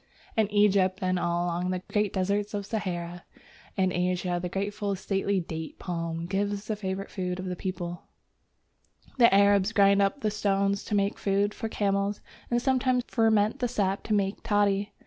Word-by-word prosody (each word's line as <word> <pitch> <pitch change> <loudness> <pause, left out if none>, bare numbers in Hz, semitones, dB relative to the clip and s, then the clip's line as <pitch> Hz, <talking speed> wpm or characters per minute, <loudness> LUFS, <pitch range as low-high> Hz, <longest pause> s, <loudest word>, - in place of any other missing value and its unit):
In 220 -2 +2
Egypt 200 -2 +3
and 185 0 +1
all 175 0 0
along 175 +1 -1
the 185 0 -2
great 210 -2 +2
deserts 200 +2 -1
of 200 -1 -3
Sahara 175 -5 -4 0.5
and 185 -1 +2
Asia 180 0 0
the 180 - -3
graceful 200 +1 -2
stately 195 +1 0
Date 160 -2 -6
palm 165 -2 -4
gives 200 +2 -2
the 215 - -2
favourite 195 -1 -4
food 180 -2 -3
of 185 - -5
the 180 -1 -3
people 175 -1 -5
(see - - -42
Chap. - - -31
X.). - - -25
The 235 -4 +7
Arabs 200 +1 +4
grind 200 -1 +5
up 200 +8 +1
the 215 - 0
stones 200 -1 0
to 210 - -1
make 200 0 0
food 200 +1 +1
for 225 - -4
camels, 200 -1 0 0.3
and 240 - +2
sometimes 255 -1 +1
ferment 220 -2 +2
the 245 - +1
sap 200 -5 0
to 215 - 0
make 195 0 -1
toddy. 205 -1 +1
200 Hz, 185 wpm, -27 LUFS, 185-205 Hz, 0.5 s, The